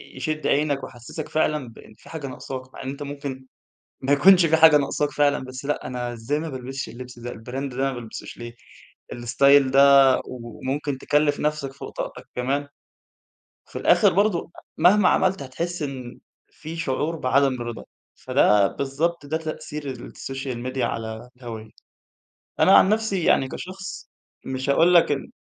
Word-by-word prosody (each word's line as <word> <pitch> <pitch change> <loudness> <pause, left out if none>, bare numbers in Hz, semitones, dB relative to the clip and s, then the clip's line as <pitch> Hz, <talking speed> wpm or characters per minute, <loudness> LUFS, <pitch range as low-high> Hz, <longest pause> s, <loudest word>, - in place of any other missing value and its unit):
يشِد 155 +4 -2
عينَك 145 -1 +1
ويحسَسك 120 +6 -8
فعلًا 150 -4 0
بإن 110 -1 -15
في - - -17
حاجة 155 -4 -6
ناقصاك، 130 0 -8
مع - - -9
إن 130 - -4
أنت 140 +1 -6
ممكن 140 -2 -6 0.6
ما 135 +2 +2
يكونش 180 +5 +6
فيه 160 - +3
حاجة 160 -2 +8
ناقصاك 145 +1 -1
فعلًا، 145 -1 +2
بس 130 +1 -8
لأ 145 - -2
أنا 125 -1 -4
إزاي 120 +6 -2
ما 160 +1 -4
بالبسش 130 -1 -6
اللبس 125 0 -10
ده، 120 +1 -6
الBrand 125 +4 -6
ده - - -8
ما 135 0 0
بالبسوش 120 -3 -8
ليه 120 0 -8 0.6
الStyle 135 +3 +4
ده 135 +1 +6 0.4
وممكن 130 +4 -4
تكلّف 145 +2 +1
نفسَك 150 -3 -2
فوق 140 - -9
طاقتك - - -6
كمان 140 +3 -1 1.0
وفي - - -11
الآخر - - +4
برضه 200 -3 +1 0.3
مهما 195 +1 +5
عملت 190 -5 +2
هتحِس 170 +6 -4
إن 130 -4 -6 0.3
في 160 +2 -9
شعور 160 +1 -1
بعدم 135 -1 +2
الرضا، 120 -1 -6 0.3
فده 105 -1 +3
بالضبط 145 +3 -2
ده 155 - -1
تأثير 155 -3 -5 0.2
الSocial 135 -2 -6
Media 130 0 -2
على 110 +2 -4
الهَوّية، 115 -3 -8 0.9
أنا 195 - +7
عن - - +5
نفسي 215 -4 0
يعني 135 - +3
كشخص 185 +7 -8 0.4
مش 130 +1 -3
هاقول 165 +5 +4
لك 170 -3 +5
إن 140 - -3
140 Hz, 160 wpm, -24 LUFS, 130-155 Hz, 1.0 s, حاجة